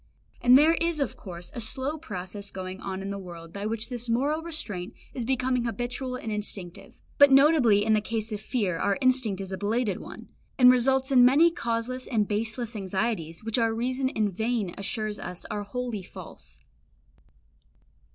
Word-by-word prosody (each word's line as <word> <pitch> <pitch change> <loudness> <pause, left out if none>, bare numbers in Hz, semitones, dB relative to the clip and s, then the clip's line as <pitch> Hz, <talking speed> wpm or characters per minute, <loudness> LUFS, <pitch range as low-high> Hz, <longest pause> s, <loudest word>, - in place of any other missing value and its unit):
And 250 +1 +7
there 310 +3 +5
is 335 -1 0
of 275 - -1
course 175 -3 -9
a 240 - -5
slow 260 +6 -2
process 200 - -6
going 185 0 -7
on 190 -1 -4
in 200 - -4
the 200 - -4
world 170 -3 -10
by 200 +1 -3
which 225 +1 -3
this 245 -1 -3
moral 280 +7 +1
restraint 220 - -5 0.2
is 250 - -3
becoming 255 0 0
habitual 250 +2 -3
and 225 -3 -5
instinctive; 200 -4 -4 0.2
but 285 -1 +8
notably 270 -7 +5
in 220 - +3
the 215 - +3
case 225 +1 -3
of 210 -1 -4
fear 205 -8 -1
our 200 - +1
instinct 255 -7 +2
is 190 -1 -7
a 190 - -4
belated 210 -1 0
one, - - -10 0.3
and 250 -2 +8
results 265 +2 +2
in 250 -2 +7
many 290 +7 +6
causeless 235 -2 -3
and 215 -4 +1
baseless 225 +2 -3
anxieties 190 -3 -2
which 225 +2 0
our 225 -1 +1
reason 255 +3 -1
in 215 -5 0
vain 220 -1 -1
assures 215 +1 -3
us 180 - -5
are 210 - -2
wholly 230 +1 -4
false. 180 - -12
225 Hz, 180 wpm, -27 LUFS, 200-255 Hz, 0.3 s, but